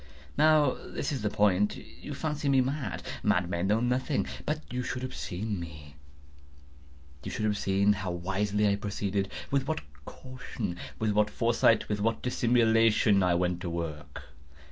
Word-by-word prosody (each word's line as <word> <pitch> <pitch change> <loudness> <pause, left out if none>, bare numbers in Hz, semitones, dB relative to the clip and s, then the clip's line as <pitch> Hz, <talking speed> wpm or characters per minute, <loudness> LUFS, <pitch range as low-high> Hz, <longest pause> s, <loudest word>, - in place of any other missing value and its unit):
Now 150 -2 +5
this - - -5
is 135 - -2
the 105 - 0
point. 105 0 +2
You - - -9
fancy 150 -2 -2
me 135 -1 +5
mad. 130 -2 -2 0.2
Madmen 90 0 +1
know 105 +3 +3
nothing. 125 +4 0 0.2
But 155 0 -1
you 125 - -1
should 125 +1 -4
have 130 - -4
seen 100 +2 -4
me. 75 -4 -9 1.3
You - - -5
should 110 - -2
have 105 -1 +1
seen 100 +1 +2
how 95 -2 -4
wisely 100 +4 0
I 100 0 +2
proceeded—with 100 +6 -2
what 160 - -1 0.2
caution—with 110 -5 -5
what 105 0 +2
foresight—with 115 -2 +2
what 115 +1 0
dissimulation 115 -4 +3
I 90 -2 +3
went 90 0 0
to 90 - -3
work! 75 -4 -5
105 Hz, 145 wpm, -29 LUFS, 95-125 Hz, 1.3 s, Now